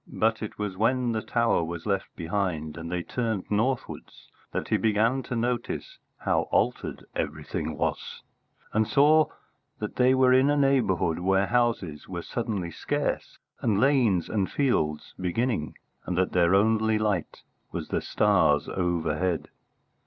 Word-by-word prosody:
But 110 0 +1
it 110 - -6
was 105 -3 -3
when 120 +4 +1
the 110 -1 -1
Tower 115 -7 +1
was 85 0 -5
left 100 -2 -2
behind 85 -3 -2
and 85 0 -7
they 90 -1 -2
turned 110 -4 -2
northwards 120 +5 -2 0.2
that - - -3
he - - +3
began 115 +4 +2
to 125 - -5
notice 120 +1 -2 0.2
how - - 0
altered - - 0
everything - - -3
was, - - -3 0.5
and 110 0 +2
saw 150 +2 +5 0.5
that 105 - -5
they 130 +1 +5
were 130 -1 +5
in 130 +2 +5
a 145 - +2
neighbourhood 120 - +2
where 95 +2 +2
houses 100 -9 0
were 85 -2 -5
suddenly 105 -7 -3
scarce, - - -2 0.2
and 105 -4 +1
lanes 125 -10 +3
and 100 -3 -1
fields 80 - 0
beginning, 95 -1 -1 0.3
and 90 - -2
that 95 0 +1
their 90 +1 +4
only 110 +1 +3
light 105 -6 -2 0.3
was - - -5
the - - 0
stars 75 0 +2
overhead. 85 -1 -1
105 Hz, 145 wpm, -27 LUFS, 90-120 Hz, 0.5 s, saw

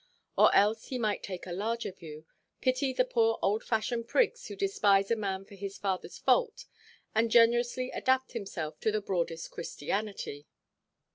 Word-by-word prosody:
Or - - +6
else 215 +3 +3
he 255 - -3
might 215 -4 0
take 185 -2 -6
a 180 - -7
larger 220 +5 -2
view, 160 -4 -11 0.3
pity 260 +1 +1
the 255 -1 +2
poor 225 -3 +2
old–fashioned 225 +3 0
prigs 485 - +1
who - - -7
despise 205 - +2
a - - +4
man 195 -3 -3
for 200 - -16
his 200 0 -6
fatherʼs 190 -1 -3
fault, 470 -3 +2 0.5
and 225 +1 +2
generously 240 +2 +3
adapt 260 0 +1
himself 195 -9 -5
to 220 - +1
the 215 - 0
broadest 170 -5 -3
Christianity. 170 -3 -4
215 Hz, 155 wpm, -30 LUFS, 195-240 Hz, 0.5 s, Or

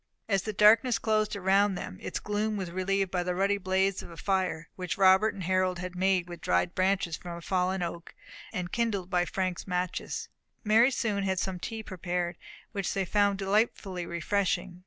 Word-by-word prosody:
As 195 -3 +2
the 215 - -3
darkness 220 +4 +5
closed 215 -1 +1
around 195 +1 +3
them, 95 - -6
its - - -4
gloom 210 +1 -1
was 185 -3 -4
relieved 190 +1 0
by 180 - 0
the 180 0 -2
ruddy 200 +2 +1
blaze 190 0 +1
of - - -10
a 170 - -11
fire, 185 -5 -1
which 180 +3 -4
Robert 190 +2 +5
and 195 - -6
Harold 185 0 +1
had 180 +1 -6
made 185 -1 +2
with 175 -1 -9
dried 90 - +1
branches 185 -3 +1
from 175 -1 -7
a - - -9
fallen 185 +1 0
oak, 170 0 -6 0.4
and 180 -1 -4
kindled 205 -6 -1
by 175 -1 +2
Frank's 185 0 -3
matches 180 -1 -2 0.4
Mary 225 +3 +5
soon 220 -6 -1
had 190 -1 0
some 185 0 -2
tea 225 +4 -5
prepared, 175 -2 -3 0.4
which 195 -3 -2
they 195 -1 0
found 200 +1 +2
delightfully 195 -3 0
refreshing. 180 +1 -1
190 Hz, 185 wpm, -29 LUFS, 180-200 Hz, 0.4 s, darkness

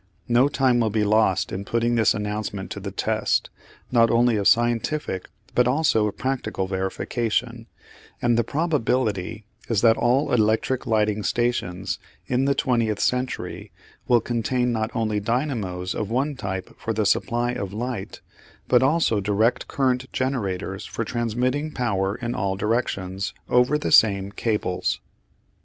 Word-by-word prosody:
No 120 +2 +4
time 130 -3 +2
will 115 -2 +2
be 110 0 +1
lost 105 -2 +2
in 95 - -4
putting 115 +4 0
this 115 -3 +3
announcement 105 -2 -4
to - - -5
the - - -5
test, - - 0 0.4
not 115 -2 +5
only 120 0 +3
of 100 -2 +1
scientific 120 -2 +1 0.2
but 125 0 +3
also 125 -6 +2
of 105 - -5
practical 130 -7 -2
verification, 115 +5 -2 0.5
and 120 -1 +2
the 120 - +2
probability 115 - -1 0.2
is 110 -4 +2
that 115 -1 +5
all 125 +4 +2
electric 110 +3 +1
lighting 105 -1 +1
stations 100 -6 -1 0.3
in 130 +1 +1
the 140 0 +2
twentieth 115 -5 +1
century 125 0 -2 0.4
will 120 -2 +4
contain 120 +2 0
not 110 -1 -1
only 110 -3 0
dynamos 105 -6 -2
of 105 - -3
one 135 +5 0
type 95 -5 -5
for 115 - -2
the 110 -1 0
supply 120 +4 +1
of 100 -7 -4
light, 115 -1 -5 0.5
but 125 - +4
also 135 -6 +2
direct 105 +4 +1
current 130 -1 0
generators 100 -7 -2
for 115 - -4
transmitting 125 +6 -1
power 100 -8 -1
in 120 -1 -4
all 100 -6 -1
directions 95 -3 -2
over 125 +4 +4
the 150 - -3
same 100 -2 +5
cables. 105 -4 -1
115 Hz, 145 wpm, -24 LUFS, 105-125 Hz, 0.5 s, not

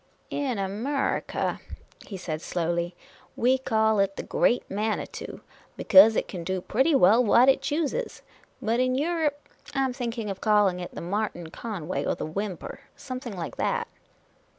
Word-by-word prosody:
"In 270 -5 -1
Amurrica," 215 +9 -1 0.5
he 195 - -6
said, 160 -4 -4
slowly, 170 0 -2 0.2
" - - -29
we 260 +1 +4
call 220 -4 +2
it 195 0 +1
the - - -5
Great 245 - +2
Manitou, 210 +2 -3 0.4
because 225 -6 +7
it - - 0
kin 180 -3 -6
do 185 +2 -2
pretty 265 - +2
well 225 +1 +6
what 240 +3 +5
it 270 - +4
chooses; 325 - -2 0.4
but 230 +2 +1
in 255 0 +2
Europe, 305 0 0 0.4
I 270 - +2
am 260 - -2
thinking 235 -4 -3
of 190 - -7
calling 205 -4 +3
it 175 - -7
the - - -5
Martin 175 -3 -3
Conway 185 -6 -4
or - - 0
the - - -4
Whymper, 190 - -5
or 280 - -27
something 255 -5 -7
like 165 - -5
that." - - 0
220 Hz, 165 wpm, -26 LUFS, 190-255 Hz, 0.5 s, because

